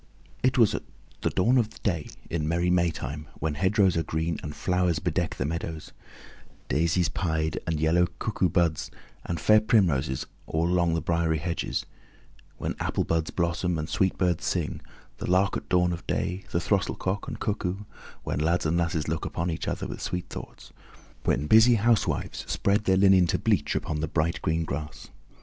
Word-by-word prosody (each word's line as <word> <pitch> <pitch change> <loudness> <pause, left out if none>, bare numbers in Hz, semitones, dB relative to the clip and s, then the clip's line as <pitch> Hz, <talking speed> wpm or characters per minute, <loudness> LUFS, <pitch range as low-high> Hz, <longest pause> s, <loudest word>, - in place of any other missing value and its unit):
It - - +2
was - - +5
at - - -2 0.4
the - - +1
dawn 120 +7 +3
of 110 -2 -2
day 85 -7 0 0.2
in 85 - -2
the 75 - -2
merry 85 +2 +1
Maytime, 80 -4 -1
when 80 0 -1
hedgerows 95 +4 +3
are 80 - +2
green 80 0 -2
and 75 -1 -6
flowers 90 -2 +1
bedeck - - -1
the 65 - -2
meadows; 80 0 -4 0.8
daisies 85 +2 +2
pied 80 +1 -1
and 80 -2 0
yellow 85 +3 +3
cuckoo 95 -4 0
buds 85 -2 +1 0.4
and 85 - -2
fair 110 +6 +5
primroses 85 - +2 0.2
all 80 +1 0
along 85 -2 +2
the 80 - -2
briery 85 -1 +1
hedges; 85 +2 -2 0.7
when - - -2
apple - - 0
buds 80 -1 0
blossom 85 0 0
and 80 0 -4
sweet 95 -1 +1
birds 90 -3 +1
sing, - - -1 0.4
the - - -4
lark 95 +2 +3
at - - -5
dawn 90 -1 +3
of 85 - -8
day, 90 +2 -2
the 85 - 0
throstle 95 +2 0
cock 95 +2 -3
and - - -6
cuckoo; 100 -2 -2 0.4
when - - -2
lads 85 +3 +1
and 80 +2 +1
lasses 85 -2 0
look 80 +1 -2
upon 85 +1 -2
each 80 - -4
other - - -2
with - - -6
sweet 90 -1 -3
thoughts; - - -9 0.5
when 70 +4 +1
busy 110 +8 +7
housewives 115 +1 +1
spread 100 +1 +1
their 95 0 +4
linen 95 -2 +6
to - - +1
bleach - - +1
upon 75 - -2
the 80 - -1
bright 80 +1 0
green 80 +1 0
grass. 75 0 -6
85 Hz, 180 wpm, -27 LUFS, 80-95 Hz, 0.8 s, busy